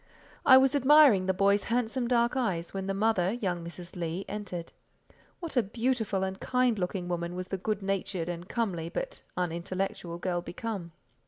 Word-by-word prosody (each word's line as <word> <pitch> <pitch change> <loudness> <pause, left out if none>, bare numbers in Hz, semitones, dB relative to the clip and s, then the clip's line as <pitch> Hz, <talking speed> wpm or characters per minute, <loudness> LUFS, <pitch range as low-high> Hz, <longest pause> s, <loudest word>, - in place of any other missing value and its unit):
I 260 - +10
was 265 0 +4
admiring 280 -8 +6
the - - +4
boy's 200 +2 +2
handsome 240 +1 0
dark 235 0 +2
eyes, 185 -10 -1
when 195 0 -3
the 195 - 0
mother, 195 -2 +2
young 180 -7 -2
Mrs. 170 +1 -9
Leigh, 175 +2 -3
entered. 185 -5 -6 0.7
What 335 -4 -5
a 245 - +5
beautiful 225 -2 -1
and 190 0 -3
kind 250 -4 +1
looking 180 0 -2
woman 175 0 -3
was 185 0 -5
the 195 - -3
good 210 +1 -2
natured 195 -3 -2
and 175 +1 -5
comely, 180 -9 -2
but - - -5 0.2
unintellectual, 175 0 -3
girl 175 0 -1
become! 180 -1 -5
195 Hz, 170 wpm, -29 LUFS, 175-230 Hz, 0.7 s, I